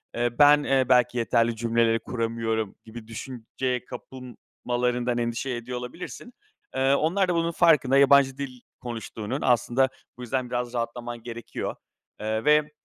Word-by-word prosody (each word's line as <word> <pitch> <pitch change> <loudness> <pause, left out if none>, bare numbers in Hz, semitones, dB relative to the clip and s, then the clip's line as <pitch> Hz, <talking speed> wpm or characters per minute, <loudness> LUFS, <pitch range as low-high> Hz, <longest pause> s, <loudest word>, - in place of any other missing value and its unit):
eee, 120 0 -1
ben, 145 0 +7
eee, 135 -2 +2
belki 125 -1 +4
yeterli 115 0 +2
cümleleri 115 0 +2
kuramıyorum 115 -3 -2
gibi 110 0 -10
düşünceye 125 +1 -4
kapılmalarından 125 -1 -4
endişe 120 +2 -2
ediyor 125 0 -4
olabilirsin. 170 - -8 0.4
Eee, 135 +1 +3
onlar 180 +7 +2
da 175 - +1
bunun 165 0 +1
farkında 150 -6 +4
yabancı 140 -1 +5
dil 130 -3 -6 0.2
konuştuğunun, 115 +1 -5
aslında 125 +1 +2 0.3
bu 125 - -10
yüzden 125 0 -2
biraz 120 0 -3
rahatlaman 120 0 -4
gerekiyor, 120 -1 -5 0.4
eee, 110 +1 -2
ve, 150 0 +4
125 Hz, 135 wpm, -26 LUFS, 115-135 Hz, 0.4 s, ben